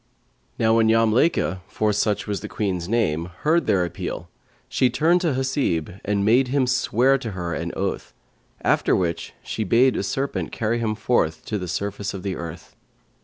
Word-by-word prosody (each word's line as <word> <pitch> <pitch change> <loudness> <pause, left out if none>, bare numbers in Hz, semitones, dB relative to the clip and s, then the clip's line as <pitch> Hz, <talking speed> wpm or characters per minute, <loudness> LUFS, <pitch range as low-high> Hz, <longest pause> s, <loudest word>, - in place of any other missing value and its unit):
Now 110 0 +3
when 110 -1 +4
Yamlaykhα 115 - +2
(for 105 -1 0
such 105 0 0
was 100 -2 -2
the - - -5
Queen's 90 -4 -2
name) 90 -8 0
heard 165 +3 +2
their 90 -2 +3
appeal, 85 - -5 0.4
she 130 - +2
turned 170 +6 +3
to 165 -5 +1
Hasib 130 - -1
and 100 -1 0
made 125 +5 +4
him 135 +1 +2
swear 130 +1 +2
to 115 -5 -5
her 85 -2 -3
an - - -3
oath; - - -3 0.5
after - - +3
which 85 -3 -2
she 110 - -3
bade 120 +6 +4
a - - 0
serpent 135 +8 -2
carry 115 +1 -1
him 110 -2 -1
forth 105 -8 0
to 105 - -2
the 90 - -5
surface 100 +3 -3
of 95 - -7
the 95 -2 -2
earth. 85 +1 -8
110 Hz, 175 wpm, -23 LUFS, 95-125 Hz, 0.5 s, when